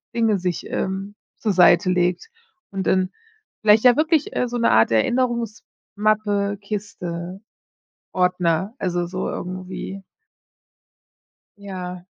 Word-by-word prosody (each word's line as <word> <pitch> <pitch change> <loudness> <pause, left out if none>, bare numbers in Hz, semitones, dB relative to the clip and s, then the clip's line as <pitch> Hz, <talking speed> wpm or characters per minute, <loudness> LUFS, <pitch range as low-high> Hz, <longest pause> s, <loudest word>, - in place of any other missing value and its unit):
Dinge 225 -4 +2
sich, 180 -1 -2
ähm, 195 +1 -3 0.2
zur 215 - 0
Seite 185 +1 +5
legt 180 - 0 0.4
und 195 -1 -3
dann 185 0 +2 0.5
vielleicht 215 0 +5
ja 245 -1 +7
wirklich, 315 -1 +2
äh, 250 - +1
so 245 0 -3
'ne 235 - +3
Art 110 +1 +4
Erinnerungsmappe, 215 - 0
Kiste, 190 -3 -5 0.7
Ordner, 180 +2 +1
also, 175 -2 -1
so 185 +2 -3
irgendwie. 185 +1 -6 1.6
Ja. 180 -3 -7
195 Hz, 110 wpm, -22 LUFS, 180-215 Hz, 1.6 s, ja